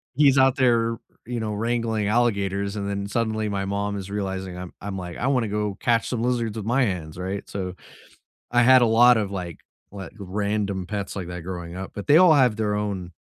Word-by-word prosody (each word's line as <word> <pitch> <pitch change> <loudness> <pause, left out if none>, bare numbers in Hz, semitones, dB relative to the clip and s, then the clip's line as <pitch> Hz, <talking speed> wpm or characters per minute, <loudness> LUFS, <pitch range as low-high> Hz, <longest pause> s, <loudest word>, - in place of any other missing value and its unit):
he's 140 -1 +5
out 130 0 +4
there, 115 -3 +2 0.3
you 120 -1 -4
know, 105 -1 -3
wrangling 115 -1 -1
alligators, 100 -3 0
and 100 -1 -3
then 100 0 -3
suddenly 110 0 -1
my 100 -1 -2
mom 100 +1 -2
is 95 -1 -7
realizing 95 -2 -4
I'm 90 -1 -8
I'm 100 -1 -5
like, 90 -2 -6
"I 125 - -1
wanna 125 -5 +1
go 105 -1 -2
catch 115 -3 +1
some 120 -2 -2
lizards 120 -3 -1
with 105 - -5
my 125 +4 +2
hands," 90 -7 -3
right? 95 +2 -4
So 95 -2 -5 0.8
I 120 0 +4
had 130 +1 +7
a - - +5
lotta, 115 -1 +5
like, 90 -4 -6 0.3
like, 100 -1 -8
random 100 -1 -2
pets 100 0 -4
like 95 -3 -5
that 90 0 -6
growing 85 -1 -6
up, 95 +1 -6
but 100 - -6
they 150 - +7
all 180 -2 +7
have 130 -6 +4
their 105 -2 0
own 100 -4 -3
105 Hz, 210 wpm, -24 LUFS, 95-115 Hz, 0.8 s, had